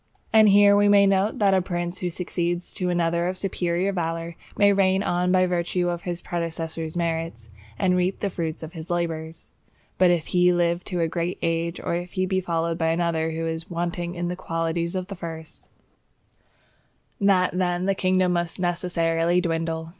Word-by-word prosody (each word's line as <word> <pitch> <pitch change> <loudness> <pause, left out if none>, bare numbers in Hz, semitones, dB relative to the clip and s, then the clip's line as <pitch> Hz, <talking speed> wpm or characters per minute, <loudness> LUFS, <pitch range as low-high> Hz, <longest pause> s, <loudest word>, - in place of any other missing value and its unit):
And 220 -1 +7
here 200 0 +6
we 205 0 +4
may 200 0 +6
note 195 +2 +2
that 200 -2 +3
a 190 - +3
prince 175 0 -4
who 180 - -2
succeeds 175 0 -3
to 180 -1 -2
another 170 0 +1
of 185 +1 -2
superior 185 0 -1
valour, 165 -1 -3 0.2
may 200 0 +5
reign 190 0 +2
on 180 -1 +1
by 185 0 +4
virtue 175 0 0
of 175 -1 -3
his 175 -1 -5
predecessor's 165 -1 -4
merits, 165 -10 -3 0.3
and 180 +4 +2
reap 180 +1 0
the 200 - -2
fruits 165 -2 -4
of 160 - -8
his 165 +1 -8
labours; 165 -2 -3 0.5
but 185 -1 +6
if 175 -3 +1
he 180 0 +5
live 175 0 +1
to 180 -3 -2
a 165 - +2
great 170 +2 -2
age, 165 +1 -1
or - - -3
if 175 +1 -4
he 185 0 0
be 190 0 0
followed 165 -2 -1
by 165 - +1
another 165 -1 0
who 165 0 -3
is 160 0 -4
wanting 175 +1 -3
in 175 0 -2
the 180 - -3
qualities 165 0 -2
of 185 -1 -2
the 200 - -7
first, 160 -2 -9 1.5
that 190 -3 +3
then 180 0 0
the 195 - +2
kingdom 185 -1 +2
must 175 0 -2
necessarily 175 -1 +1
dwindle. 165 -1 -2
175 Hz, 185 wpm, -24 LUFS, 165-185 Hz, 1.5 s, And